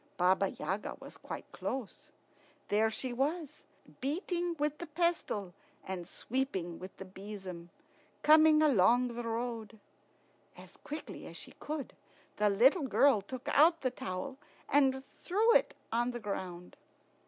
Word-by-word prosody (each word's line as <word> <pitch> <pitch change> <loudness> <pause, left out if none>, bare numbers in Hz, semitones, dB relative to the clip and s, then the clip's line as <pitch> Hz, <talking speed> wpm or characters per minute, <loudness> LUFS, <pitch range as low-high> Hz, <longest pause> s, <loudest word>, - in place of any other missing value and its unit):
Baba 185 +2 +4
Yaga 195 +3 -3
was - - -11
quite - - -7
close. 270 +4 -5 0.6
There 215 +2 +3
she 245 +3 -4
was, 295 +4 -2 0.3
beating 345 +4 -1
with 300 0 -1
the 345 - -5
pestle 310 - -1 0.3
and 180 -3 -5
sweeping 190 -9 -2
with 185 +1 -9
the 190 - -7
besom, 190 -3 -8 0.5
coming 310 0 +7
along 245 -2 +5
the 240 0 -5
road. 230 -1 -4 0.8
As - - -13
quickly 300 +2 -7
as - - -9
she - - -9
could, 300 -3 -5 0.4
the 210 0 +3
little 265 - +4
girl 270 -5 +5
took 250 +6 -8
out 325 +3 +5
the 255 - 0
towel 190 +5 -5 0.3
and 265 -1 +3
threw 435 +6 +2
it - - +3 0.2
on 240 +2 +1
the 240 -1 -4
ground. 185 -4 -5
245 Hz, 135 wpm, -33 LUFS, 200-295 Hz, 0.8 s, coming